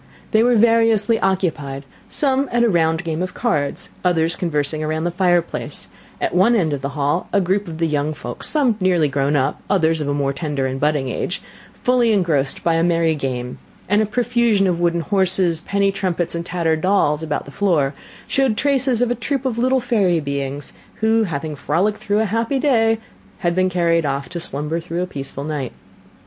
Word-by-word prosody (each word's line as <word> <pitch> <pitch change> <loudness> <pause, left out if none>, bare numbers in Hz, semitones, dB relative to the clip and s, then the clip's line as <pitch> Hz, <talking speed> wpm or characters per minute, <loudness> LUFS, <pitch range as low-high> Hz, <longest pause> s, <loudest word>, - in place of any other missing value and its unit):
They 220 - +4
were 245 +1 +4
variously 225 -1 +4
occupied; 160 -8 -1 0.2
some 275 -1 +1
at 240 0 +2
a 235 - +4
round 165 -2 +1
game 165 0 -3
of 185 0 -4
cards; 150 -13 -1
others 170 -2 +2
conversing 155 -3 -1
around 155 +1 -2
the 175 - 0
fireplace; 175 -1 0 0.3
at - - -1
one 190 +7 +4
end 165 -8 +1
of 140 - -3
the 140 - -3
hall 145 +5 0
was - - +2
a 190 - -1
group 195 +2 0
of 160 -2 -6
the 165 - +1
young 150 0 -1
folks, 120 -3 -5
some 270 -7 +2
nearly 180 -5 +2
grown 140 +1 0
up, 140 +1 0
others 165 -4 +2
of 145 - -3
a 145 - 0
more 140 -1 0
tender 145 -3 -2
and 130 0 -3
budding 150 -2 +1
age, 175 - -3 0.4
fully 245 -3 +3
engrossed 155 -9 0
by 170 - +2
a 165 0 +2
merry 165 -2 +2
game; 125 -4 -4 0.3
and 205 +3 +3
a 215 - 0
profusion 235 -2 +2
of 180 -2 0
wooden 170 0 +1
horses, 185 -3 +2
penny 200 +1 +1
trumpets, 180 -3 -2
and 170 0 -4
tattered 165 -3 0
dolls, 170 -6 +2
about 155 -2 -3
the 140 - -11
floor, 155 -7 +1 0.3
showed 265 -5 +1
traces 265 -4 +1
of 245 - 0
a - - +3
troop 270 +3 -3
of 240 -3 -1
little 260 +2 +3
fairy 210 -9 +1
beings, 140 -1 -4 0.3
who, 220 0 +3
having 155 -3 -4
frolicked 185 +9 0
through 210 0 0
a - - +1
happy 230 +6 0
day, 230 -5 +3 0.4
had 175 -2 +1
been 185 +1 +2
carried 170 -2 +2
off 140 0 -3
to 175 - -5
slumber 150 +1 -2
through 170 +1 -3
a - - -1
peaceful 140 -4 -6
night. 145 -4 -4
175 Hz, 200 wpm, -20 LUFS, 150-215 Hz, 0.4 s, They